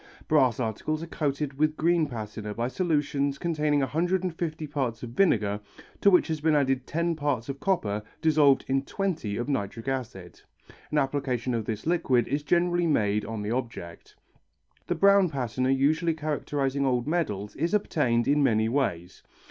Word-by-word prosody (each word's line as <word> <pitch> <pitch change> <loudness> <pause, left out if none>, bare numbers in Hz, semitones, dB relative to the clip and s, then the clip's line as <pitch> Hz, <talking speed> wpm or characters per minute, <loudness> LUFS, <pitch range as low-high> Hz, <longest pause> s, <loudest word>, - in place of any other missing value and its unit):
Brass 130 -7 +3
articles 130 +7 -2
are - - -4
coated 145 -3 -3
with 155 0 +2
green 165 -1 +2
patina 105 -3 -6
by 115 - -1
a - - -1
solution 145 -5 0
containing 150 -2 0
150 165 +1 -1
parts 130 -6 -3
of 120 - -6
vinegar 105 - +2 0.4
to 200 - +6
which 180 -2 +4
has 160 -2 -3
been 155 0 +3
added 135 -3 +1
ten 170 +1 0
parts 145 -5 -2
of 135 0 -4
copper 110 - 0 0.2
dissolved 150 -4 +4
in 135 0 +1
twenty 155 - -3
of 120 - -3
nitric 115 -3 -3
acid. 120 -9 -5 0.5
An 150 - 0
application 135 -3 0
of 115 -2 -2
this 110 -2 -4
liquid 135 -8 +2
is 145 +3 -1
generally 175 +3 +1
made 105 -8 +1
on 110 -2 -5
the 105 - -3
object. 115 -9 -5 0.7
The - - 0
brown 200 -2 +5
patina 130 -2 -2
usually 155 +5 +2
characterizing 145 -3 -1
old 125 -3 +1
medals 105 - -2
is 170 +5 0
obtained 125 - +1
in 145 +1 +3
many 110 -5 +3
ways. 105 -9 -2
140 Hz, 165 wpm, -27 LUFS, 115-155 Hz, 0.7 s, to